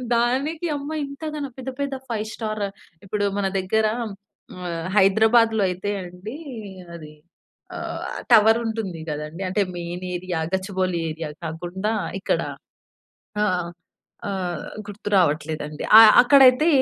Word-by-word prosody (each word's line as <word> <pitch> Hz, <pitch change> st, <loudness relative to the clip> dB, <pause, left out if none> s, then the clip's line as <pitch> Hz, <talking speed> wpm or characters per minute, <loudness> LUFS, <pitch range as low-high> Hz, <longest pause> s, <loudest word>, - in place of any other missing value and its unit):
దానికి 275 Hz, +8 st, 0 dB
అమ్మ 285 Hz, +1 st, -6 dB, 0.2 s
ఇంతగనం. 285 Hz, -1 st, -5 dB
పెద్ద, 260 Hz, 0 st, -5 dB
పెద్ద 280 Hz, -1 st, -2 dB, 0.2 s
ఫైవ్ 215 Hz, -1 st, -2 dB
స్టార్ 215 Hz, -2 st, -3 dB, 0.4 s
ఇప్పుడు 205 Hz, +1 st, -1 dB
మన 195 Hz, -, +1 dB
దగ్గర 220 Hz, +4 st, +1 dB, 0.2 s
ఆహ్, 200 Hz, -3 st, -7 dB, 0.8 s
హైదరాబాద్‌లో 220 Hz, +2 st, +4 dB
అయితే 185 Hz, +3 st, -3 dB
అండి 185 Hz, +9 st, -8 dB, 0.6 s
అది 155 Hz, -2 st, -10 dB, 0.6 s
ఆహ్, -, -, -5 dB, 0.3 s
టవర్ 225 Hz, 0 st, +7 dB
ఉంటుంది 215 Hz, -7 st, -3 dB
గదండీ! 150 Hz, +4 st, -5 dB
అంటే 205 Hz, +2 st, +1 dB
మెయిన్ 175 Hz, +1 st, -5 dB
ఏరియా 175 Hz, -1 st, -3 dB
గచ్చిబౌలి 185 Hz, -2 st, -1 dB
ఏరియా 160 Hz, -1 st, -5 dB, 0.2 s
కాకుండా 175 Hz, +6 st, -3 dB, 0.3 s
ఇక్కడ -, -, 0 dB, 1.0 s
ఆహ్, 180 Hz, -4 st, 0 dB, 0.6 s
ఆహ్, 180 Hz, -3 st, -3 dB, 0.2 s
గుర్తు 205 Hz, 0 st, -6 dB
రావట్లేదండి. 155 Hz, -3 st, 0 dB
ఆ! -, -, +12 dB, 0.2 s
అక్కడైతే 270 Hz, +3 st, +6 dB
205 Hz, 115 wpm, -23 LUFS, 175-230 Hz, 1.0 s, ఆ